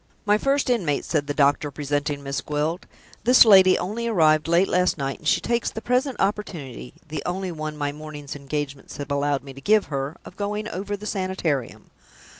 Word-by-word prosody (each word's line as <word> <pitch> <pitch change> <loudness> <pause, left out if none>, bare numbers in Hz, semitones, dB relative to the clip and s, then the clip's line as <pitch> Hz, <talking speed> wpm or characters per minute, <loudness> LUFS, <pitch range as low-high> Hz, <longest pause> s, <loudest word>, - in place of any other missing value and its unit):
"My 210 0 +3
First 275 0 +1
Inmate," 170 - 0
said 150 -3 -1
the 145 - -1
doctor, 145 0 +3
presenting 145 0 -2
Miss 140 0 -3
Gwilt. 150 +4 -2 0.4
"This 250 +1 +7
lady 190 -3 +7
only 215 +6 -3
arrived 155 -8 +3
late 170 +3 +4
last 180 0 +2
night; 135 -1 -3
and - - -7
she - - +4
takes 235 0 0
the - - -6
present 250 +3 0
opportunity 160 - -3
(the 155 - -4
only 185 +1 -3
one 155 -2 -5
my 145 -1 -1
morning's 150 -1 -8
engagements 145 -1 -5
have 145 -1 -6
allowed 140 0 0
me 135 -1 -10
to 135 - -12
give 215 +3 +3
her) 140 +4 -3
of 180 - -12
going 210 +1 -3
over 205 0 -4
the 210 - -10
Sanitarium. 185 - -2
155 Hz, 190 wpm, -24 LUFS, 145-205 Hz, 0.4 s, This